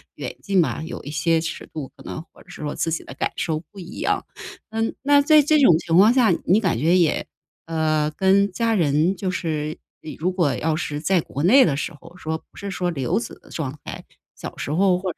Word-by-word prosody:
远 - - -5
近 195 -2 +2
吧， 160 - -1
有 165 - -7
一 145 - -7
些 160 +2 +1
尺 165 - -5
度， 150 -4 -5
可 - - -14
能 - - -6
或 - - -19
者 - - -24
是 - - -10
说 150 -1 -3
自 - - -1
己 160 - -2
的 - - -10
感 - - -1
受 160 -2 -1
不 200 - -12
一 175 - -9
样。 - - 0 0.4
嗯， 225 +1 -2
那 285 0 +5
在 305 +1 +6
这 300 +1 +3
种 180 - +6
情 165 0 -1
况 210 +5 +7
下 245 -5 +4
你 195 +4 +4
感 185 - 0
觉 165 +6 +3
也 170 -4 +1 0.4
呃， 155 -2 0
跟 195 +4 +3
家 230 +4 0
人 160 +1 +2
就 190 -1 -2
是， 155 -4 -3 0.3
呃， 155 - -7
如 175 +4 0
果 170 -8 +1
要 160 +4 0
是 150 -3 -3
在 175 +2 +2
国 145 -1 -5
内 255 +10 +7
的 145 - +1
时 165 - -3
候 165 +3 -15
说 160 -2 -3
不 - - -24
是 200 - -5
说 180 -1 -1
留 135 -8 0
子 120 - -7
的 - - -19
状 145 -3 -4
态， - - -8 0.3
小 - - -7
时 - - -4
候 185 +2 +3
或 185 -1 -3
者 - - -57
170 Hz, 255 characters per minute, -22 LUFS, 155-195 Hz, 0.4 s, 况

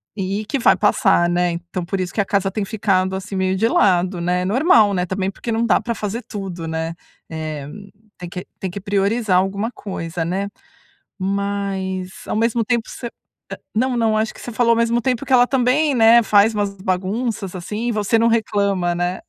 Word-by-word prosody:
e 200 +2 -3
que 275 - -1
vai - - +5
passar, 175 -4 +3
né. 175 0 +1
Então, 175 +1 -5
por 190 +2 -3
isso 180 -1 -3
que 205 - +1
a - - -2
casa 195 -1 0
tem 210 0 -2
ficado, 190 -3 0
assim, 195 +1 -6
meio 190 0 +1
de 225 +3 +2
lado, 180 -4 +2
né, 180 +1 0
normal, 220 - +4
né, 180 -1 0
também 190 +1 -2
porque 230 - -6
não 225 +1 +1
dá - - +3
pra 235 - -2
fazer 215 +3 -4
tudo, 190 -5 -6
né. 160 +1 -3 0.4
Eh, 155 -3 -5 0.5
tem 175 -1 -8
que 180 0 -7
tem 190 - -3
que 200 - -6
priorizar 200 +1 +1
alguma 200 +4 0
coisa, 165 -4 -5
né. 190 +4 -2 0.7
Mas 195 -1 -2 0.2
ao - - -2
mesmo 230 +1 +1
tempo 235 0 -1
você 235 - -7 0.7
não 250 +2 +1
não, 225 -2 +2
acho 220 0 -1
que - - -14
você 240 - -6
falou 235 +1 +2
ao 230 - +3
mesmo 235 +1 +2
tempo 255 +2 -1
que 260 - -1
ela 245 0 +6
também, 270 +3 +2
né, 230 +1 +7
faz 210 +1 +4
umas 205 -2 -2
bagunças, 190 +2 -2
assim, 210 +6 -4
e - - +1
você 215 +1 +1
não 230 - +3
reclama, 200 -5 +1
né? 175 +1 -2
200 Hz, 200 wpm, -20 LUFS, 185-230 Hz, 0.7 s, né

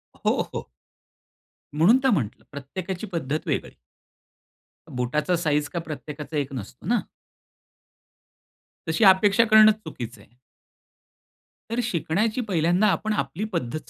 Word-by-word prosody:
हो, - - 0
हो. - - -5 1.1
म्हणून 180 +12 +5
तर 265 - +5
म्हंटलं 130 - -1
प्रत्येकाची 175 +8 -6
पद्धत 155 -2 -3
वेगळी. - - -2 1.2
बुटाचा 150 +8 0
साईझ 150 -3 0
काही 170 -1 -4
प्रत्येकाचा 150 -1 -6
एक 140 -1 -2
नसतो 120 -7 -8
ना? - - +3 1.9
तशी 160 +8 +1
अपेक्षा 195 +4 +6
करणंच 215 -1 +7
चुकीचं 120 -8 -7
आहे. 120 +5 -23 1.3
तर 235 - -1
शिकण्याची 215 +4 0
पहिल्यांदा 180 -1 +2
आपण 215 +2 0
आपली 160 +3 -3
पद्धत 155 -4 -4
165 Hz, 110 wpm, -24 LUFS, 145-205 Hz, 1.9 s, करणंच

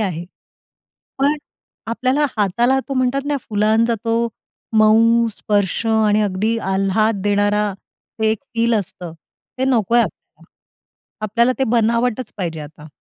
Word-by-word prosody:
आहे. 175 -5 -2 0.9
पण 285 +2 +2 0.5
आपल्याला 255 +5 +1
हाताला 235 +6 +2
तो 275 - -2
म्हणतात 255 +1 +1
ना, 290 -1 0
फुलांचा 220 +2 +2
तो 230 +1 +1 0.5
मऊ 230 +2 +5
स्पर्श 205 0 0
आणि 215 -1 +3
अगदी 210 +3 0
आल्हाद 195 +2 +1
देणारा 205 0 +1 0.5
एक 220 0 +2 0.2
फील 230 0 +2
असतं, 180 -4 -4 0.5
ते 260 - +1
नकोय 240 -3 +3
आपल्याला. - - -6 0.8
आपल्याला 235 +4 +2
ते 265 - +2
बनावटच 235 +1 +1
पाहिजे 165 -5 -4
आता. 150 +1 -11
220 Hz, 120 wpm, -19 LUFS, 205-235 Hz, 0.9 s, मऊ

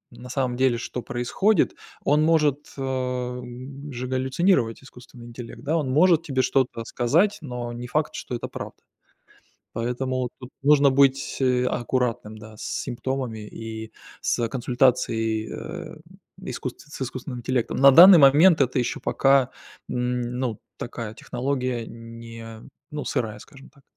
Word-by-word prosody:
на 125 +1 -11
самом 125 -1 -1
деле, 130 -2 +3
что 125 +1 -5
происходит, 125 - +1 0.3
он 150 +1 +3
может, 150 -3 +2
а, 125 -2 -2 0.5
же 125 0 -5
галлюцинировать, 130 - +1
искусственный 125 -2 -14
интеллект, 120 +1 -10
да. 150 +3 0
Он 150 -5 0
может 165 +4 +5
тебе 135 -5 0
что-то 125 -4 0
сказать, 165 - +2
но 125 -4 -5
не 120 +1 -6
факт, 150 +4 -1
что 125 - -5
это 120 - -4
правда. - - -8 1.0
Поэтому 125 +2 -2
тут 125 -1 -10
нужно 145 0 +5
быть 135 0 +2 0.3
аккуратным, 120 -3 -2
да, 110 0 -12
с - - -10
симптомами 130 -2 -3
и 110 +1 -8 0.3
с 120 - 0
консультацией, 115 -3 +1
э, 175 -1 -7 0.5
искусст 130 -8 -5
с - - -6
искусственным 130 0 -5
интеллектом. 125 0 -1
На 140 +1 +8
данный 175 +6 +10
момент 155 +4 +6
это 130 -1 +2
ещё 120 - -1
пока, 135 -1 +3 0.4
м, 125 0 -1 0.2
ну, 125 -5 -2 0.2
такая 115 -3 -6
технология 125 -2 -3
не 115 -1 -10 0.3
ну, 150 - -3
сырая, 110 -6 -2
скажем 135 +4 -15
так. 140 - -24
125 Hz, 140 wpm, -24 LUFS, 120-140 Hz, 1.0 s, данный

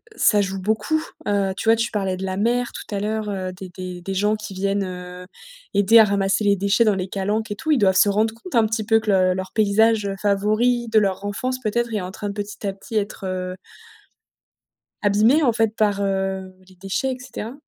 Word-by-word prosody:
ça 210 -2 +4
joue 195 -1 -3
beaucoup. 220 - 0 0.2
Heu, 200 -2 +1
tu - - -5
vois, 225 - +7
tu 230 +1 -1
parlais 195 -3 -1
de 190 - -4
la 190 0 -3
mer 240 +3 0
tout 205 - -7
à - - -1
l'heure, 215 0 -2
heu, 185 -2 -3
des 185 0 -9
des 180 0 -7
des 195 +2 -4
gens 210 +3 +2
qui 215 -3 -8
viennent, 195 +1 0
heu, 180 0 -8 0.5
aider 205 +3 +6
à - - +9
ramasser 200 +1 +1
les 200 0 +4
déchets 200 +4 +2
dans 210 -3 +3
les 185 0 -3
calanques 205 +3 -2
et - - -2
tout. 315 - -6
Ils 290 - +4
doivent 190 -4 +3
se 205 - +5
rendre 220 +2 +1
compte 245 +5 -9
un 225 -1 +5
petit 220 0 -2
peu 225 0 +4
que 215 -1 -1
le 185 -1 +3
leur 190 0 -5
paysage, 215 0 +3
heu, 195 - -3
favori 215 +4 +1
de 220 - +1
leur 195 -1 -1
enfance 255 +6 -3
peut-être 235 0 -1
est 205 - -1
en 180 +1 -6
train 205 0 -5
de - - -4
petit 205 0 -6
à 195 - -1
petit 200 +3 -10
être, 205 -1 -2
heu 185 0 -3 1.5
abîmé, 215 +9 +4
en 240 - +4
fait, 225 -1 0
par, 205 -2 +1
heu, 190 -1 -2 0.2
les 185 - -18
déchets 195 +8 -2
et 255 - -5
cetera? 250 -2 -7
205 Hz, 230 wpm, -22 LUFS, 195-220 Hz, 1.5 s, à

